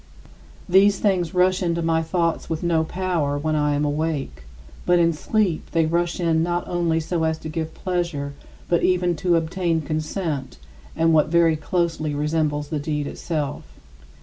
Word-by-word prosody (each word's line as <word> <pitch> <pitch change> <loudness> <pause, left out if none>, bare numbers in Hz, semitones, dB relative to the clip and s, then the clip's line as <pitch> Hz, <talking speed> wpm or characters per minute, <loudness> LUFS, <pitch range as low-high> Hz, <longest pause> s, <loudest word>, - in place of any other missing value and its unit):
These 195 +2 +5
things 185 -5 0
rush 185 +1 +3
into 170 -2 0
my 165 0 +2
thoughts 165 0 -1
with 160 0 -3
no 165 -2 +2
power 165 -5 -1
when 155 +2 -1
I 150 -1 +1
am 145 +1 0
awake; 150 - -2 0.4
but 175 0 +3
in 170 -1 +3
sleep 185 +1 -1
they 165 -1 +3
rush 170 +2 0
in 165 -2 +2
not 175 +1 -1
only 170 -2 0
so 160 +1 -2
as 160 0 +1
to 160 0 -7
give 160 0 -4
pleasure, 170 -6 -2 0.3
but 170 - +2
even 180 -1 +2
to 175 +2 +2
obtain 165 0 0
consent 155 -2 -3 0.4
and 165 0 +3
what 155 -1 +4
very 165 0 +3
closely 155 -1 -1
resembles 150 -1 -1
the 155 - -2
deed 150 0 -2
itself. 150 -1 -3
165 Hz, 165 wpm, -23 LUFS, 155-175 Hz, 0.4 s, These